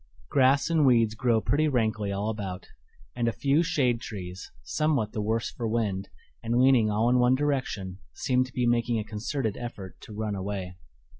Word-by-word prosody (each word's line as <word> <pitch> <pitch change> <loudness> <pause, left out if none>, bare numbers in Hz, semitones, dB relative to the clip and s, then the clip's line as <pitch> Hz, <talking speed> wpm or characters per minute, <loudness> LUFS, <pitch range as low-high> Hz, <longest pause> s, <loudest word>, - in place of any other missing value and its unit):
Grass 135 +4 +3
and 160 -2 +3
weeds 115 -5 +4
grow 115 0 +2
pretty 150 +7 +1
rankly 110 -6 0
all 100 +2 -2
about, 95 -4 -5 0.5
and 120 -1 0
a - - +2
few 140 +6 +2
shade 125 -8 +1
trees, 90 -5 -7
somewhat 145 -9 0
the 105 - -3
worse 110 +2 -1
for 115 - -4
wind, 105 -4 -1 0.3
and 115 +1 -1
leaning 125 -4 +5
all 105 +2 +1
in 125 +1 +4
one 125 +1 +4
direction, 130 -10 -2
seem 130 -1 +1
to 130 - -10
be 125 - 0
making 120 0 +1
a 110 - -1
concerted 110 +2 -3
effort 105 -6 -8
to - - -12
run 110 -1 -2
away. 95 -2 -4
115 Hz, 180 wpm, -27 LUFS, 105-130 Hz, 0.5 s, leaning